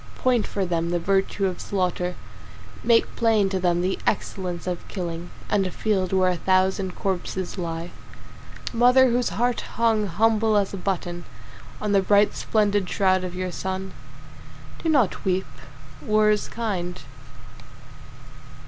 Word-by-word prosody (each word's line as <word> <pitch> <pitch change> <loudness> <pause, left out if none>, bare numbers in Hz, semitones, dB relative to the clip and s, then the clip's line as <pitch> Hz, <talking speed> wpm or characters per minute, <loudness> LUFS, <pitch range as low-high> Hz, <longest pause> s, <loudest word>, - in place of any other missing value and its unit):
Point 245 -4 +1
for 195 -2 -2
them 170 -1 -1
the 175 - +1
virtue 195 +2 0
of 185 -2 -2
slaughter, 180 -2 -1 0.7
Make 230 -1 +3
plain 220 -4 +3
to 190 -1 -1
them 175 -1 +1
the 185 +1 -1
excellence 180 -4 -2
of 180 -1 -4
killing 175 -2 -5 0.2
And 195 -2 +1
a - - -3
field 190 -2 -1
where 185 -1 +3
a 180 - -2
thousand 190 +1 +1
corpses 185 -1 -3
lie. 165 0 -4 0.8
Mother 250 +2 +5
whose 245 +1 +1
heart 245 0 0
hung 225 -3 +2
humble 220 +3 +2
as 200 -1 0
a - - -3
button 175 -2 -3 0.5
On 210 - -2
the 200 -1 +4
bright 205 +2 +4
splendid 205 -3 +1
shroud 185 -1 +2
of 180 -1 -5
your 185 0 -3
son, 190 +1 -4 0.9
Do 330 - -1
not 260 - +2
weep. 190 0 0 0.6
War 215 +5 +3
is 210 - 0
kind. 180 -6 -3
190 Hz, 145 wpm, -24 LUFS, 180-215 Hz, 0.9 s, Mother